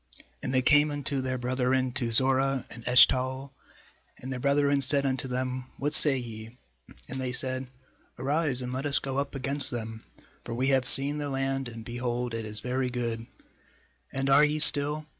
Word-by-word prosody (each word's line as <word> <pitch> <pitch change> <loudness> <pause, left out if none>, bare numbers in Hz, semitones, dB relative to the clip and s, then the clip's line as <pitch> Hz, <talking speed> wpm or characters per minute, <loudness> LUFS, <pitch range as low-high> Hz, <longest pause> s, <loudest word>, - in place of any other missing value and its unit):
8And - - -3
they 130 -1 +1
came 150 +2 +4
unto 145 -2 -2
their 130 0 -3
brethren 130 +1 -1
to 120 -2 -3
Zorah 135 +2 +1
and 120 - -11
Eshtaol; 130 +2 +3 0.7
and 130 +1 -7
their 125 - -6
brethren 140 +1 +1
said 140 +1 +2
unto 135 0 -2
them: 130 0 -4
'What 145 +2 -3
say 145 -3 +7
ye?' 115 -1 -9 0.5
9And 130 - -7
they 130 -1 -3
said: 130 +1 -3 0.5
'Arise, 140 -1 -2
and 125 0 -6
let 135 +3 -3
us 140 - +2
go 135 0 -3
up 140 0 -5
against 140 +1 +1
them; 110 -2 -7 0.4
for 115 - -6
we 130 +3 0
have 135 -2 +1
seen 140 +4 +5
the 145 -1 -4
land, 135 -1 -3
and, 115 -1 -11
behold, 120 0 -4
it 115 -1 -5
is 105 0 -8
very 125 +1 -2
good; 115 -2 -5 0.8
and 135 0 -3
are 140 +2 +5
ye 150 0 +1
still? 150 0 +5
130 Hz, 180 wpm, -27 LUFS, 125-140 Hz, 0.8 s, say